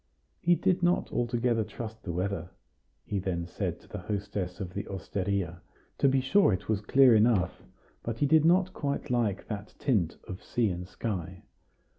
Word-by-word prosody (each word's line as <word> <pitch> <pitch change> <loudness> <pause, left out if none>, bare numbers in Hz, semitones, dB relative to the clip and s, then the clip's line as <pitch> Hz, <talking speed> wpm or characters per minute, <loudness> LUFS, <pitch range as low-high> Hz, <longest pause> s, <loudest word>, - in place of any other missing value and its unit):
He 175 +1 +4
did 185 0 +1
not 175 +1 +2
altogether 120 -1 +1
trust 110 +1 -7
the 90 - -4
weather, 90 0 -2 0.6
he 100 - -2
then 90 -3 -2
said 90 - -3
to - - -19
the - - -6
hostess 100 -1 -4
of 90 -3 -5
the 100 - -4
osteria; 95 -2 -2 0.4
to 140 - +5
be 135 0 +3
sure, 165 - +4
it 95 +1 -2
was 105 -2 0
clear 130 +3 +6
enough, 105 -5 +3 0.4
but 115 -1 -4
he 145 - +2
did 155 +1 +5
not 185 +3 +4
quite 140 -5 -3
like 115 -6 0
that 105 -1 -6
tint 100 - +1
of 95 - -7
sea 115 -5 +1
and 90 0 -5
sky. 95 -4 -4
105 Hz, 175 wpm, -29 LUFS, 95-130 Hz, 0.6 s, clear